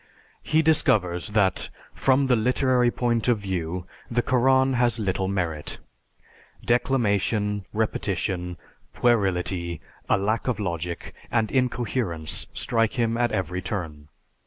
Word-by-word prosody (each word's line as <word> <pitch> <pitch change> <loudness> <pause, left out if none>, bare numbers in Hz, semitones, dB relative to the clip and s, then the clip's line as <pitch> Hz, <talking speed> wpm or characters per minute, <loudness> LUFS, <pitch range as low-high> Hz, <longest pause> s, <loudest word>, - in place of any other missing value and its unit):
He 160 +1 +2
discovers 95 - +2
that 105 -3 +1 0.2
"from 135 +1 +3
the 130 -2 +4
literary 125 +1 +2
point 120 -1 0
of 120 -2 +4
view, 90 -3 -3 0.2
the 120 0 +1
Koran 130 +1 +3
has 120 -2 +2
little 95 -3 -1
merit. 85 -6 -2 0.9
Declamation, 105 -4 +1
repetition, 95 -4 -2 0.4
puerility, 90 -7 +1 0.3
a - - +4
lack 110 +5 -1
of 125 -3 0
logic, 85 -3 -4 0.2
and 110 -2 +1
incoherence 120 - -1
strike 115 -2 0
him 115 -3 0
at 120 0 +1
every 90 -1 -2
turn. 80 -8 -5
110 Hz, 115 wpm, -25 LUFS, 90-120 Hz, 0.9 s, the